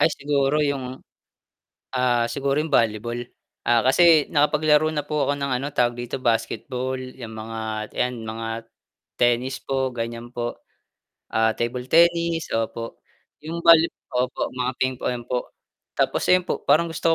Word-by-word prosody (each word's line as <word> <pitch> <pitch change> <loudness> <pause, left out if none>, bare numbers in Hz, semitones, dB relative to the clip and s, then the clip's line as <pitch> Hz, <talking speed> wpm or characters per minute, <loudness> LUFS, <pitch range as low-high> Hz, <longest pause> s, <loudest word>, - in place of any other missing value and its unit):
Ay 165 - +4
siguro 140 +1 +1
'yung, 135 -3 -2 0.9
ah, 125 -2 +2
siguro 140 +3 -1
yung 150 -1 -1
volleyball, 115 +2 +1 0.5
ah, 120 0 +4
kasi 155 +2 +6
nakapaglaro 150 +1 +3
na 150 -2 -3
po 150 0 -1
ako 145 - +1
ng 140 -1 -2
ano 140 - -3
tawag 120 -4 +1
dito, 120 +2 -5
basketball 125 +2 -1
'yang 130 -2 -8
mga 110 -1 -5
'yan, 125 -2 -2
mga 115 +1 -5 0.5
tennis 125 +2 +1
po 135 -2 -1
gan'yan 115 +1 -5
po, 120 -1 -3 0.8
ah, 110 0 +2
table 125 +2 -3
tennis 170 0 +3
opo. 115 +1 -3 0.4
'Yong 165 +3 -6
volley 165 -1 +7 0.2
opo, 125 0 -1
mga 125 0 -1
ping-pong 125 -2 -2
po 125 0 -3 0.5
tapos - - +1
'yun 185 0 +5
po - - -2
parang 165 +4 +4
gusto 160 - -3
130 Hz, 145 wpm, -23 LUFS, 120-150 Hz, 0.9 s, volley